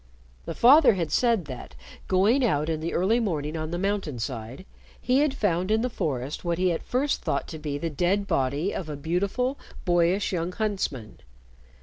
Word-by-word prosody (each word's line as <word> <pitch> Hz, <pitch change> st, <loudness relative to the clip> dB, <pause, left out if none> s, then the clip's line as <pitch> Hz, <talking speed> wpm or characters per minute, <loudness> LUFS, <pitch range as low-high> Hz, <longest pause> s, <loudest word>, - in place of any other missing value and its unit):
The -, -, -5 dB
father 275 Hz, +2 st, +7 dB
had 165 Hz, -5 st, -2 dB
said 230 Hz, -3 st, +2 dB
that, 130 Hz, -, -9 dB, 0.3 s
going 205 Hz, +8 st, +3 dB
out 155 Hz, -9 st, +1 dB
in 160 Hz, -1 st, -1 dB
the 165 Hz, +2 st, -3 dB
early 200 Hz, +7 st, +2 dB
morning 155 Hz, -8 st, -2 dB
on 155 Hz, -1 st, -3 dB
the 175 Hz, -, -3 dB
mountain 195 Hz, -7 st, -2 dB
side, 120 Hz, +6 st, -6 dB, 0.3 s
he 255 Hz, +2 st, +2 dB
had 295 Hz, -1 st, +3 dB
found 185 Hz, -5 st, 0 dB
in 220 Hz, +2 st, +2 dB
the 250 Hz, -, -1 dB
forest 135 Hz, -, -3 dB
what 170 Hz, -1 st, -1 dB
he 185 Hz, 0 st, +2 dB
at 165 Hz, -, -2 dB
first 275 Hz, +3 st, -1 dB
thought -, -, -2 dB
to 160 Hz, -, -7 dB
be 150 Hz, -2 st, -3 dB
the 165 Hz, +2 st, -3 dB
dead 180 Hz, +7 st, +1 dB
body 140 Hz, +5 st, 0 dB
of 165 Hz, -, -5 dB
a 150 Hz, -, -4 dB
beautiful, 200 Hz, -, -1 dB, 0.3 s
boyish, 175 Hz, +3 st, +2 dB
young 175 Hz, +1 st, -2 dB
huntsman. 190 Hz, -, -3 dB
175 Hz, 190 wpm, -26 LUFS, 150-210 Hz, 0.3 s, father